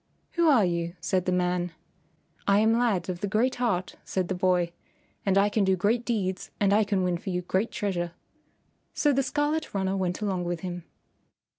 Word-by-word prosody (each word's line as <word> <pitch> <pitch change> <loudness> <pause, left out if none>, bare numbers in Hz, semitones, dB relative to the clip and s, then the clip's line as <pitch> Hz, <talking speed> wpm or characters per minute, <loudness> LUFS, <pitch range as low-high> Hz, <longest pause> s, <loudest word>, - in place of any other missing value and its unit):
"Who 340 -1 +2
are 240 -9 +5
you?" 170 0 -2
said 185 -1 0
the 185 - +1
man. 180 -1 0 0.7
"I 200 0 +5
am 220 +2 +4
Lad 230 -8 +1
of 180 -2 -3
the 205 - -2
Great 225 +6 +2
Heart," 210 -7 -1
said 185 -2 -2
the - - +1
boy, 180 -2 +1 0.6
"and 195 0 +3
I 200 +1 +5
can 205 0 +1
do 190 -1 +3
great 220 +6 +1
deeds 190 -6 -2
and 200 -1 +3
I 215 +1 +5
can 200 -2 0
win 180 -1 0
for 190 - -6
you 180 -1 -1
great 190 +5 0
treasure." 180 -6 -2 0.8
So 295 -1 +3
the 270 - +3
Scarlet 295 +1 -1
Runner 190 0 0
went 185 -2 -1
along 190 -4 -1
with 175 -1 -3
him. 175 -2 -5
190 Hz, 195 wpm, -27 LUFS, 180-220 Hz, 0.8 s, are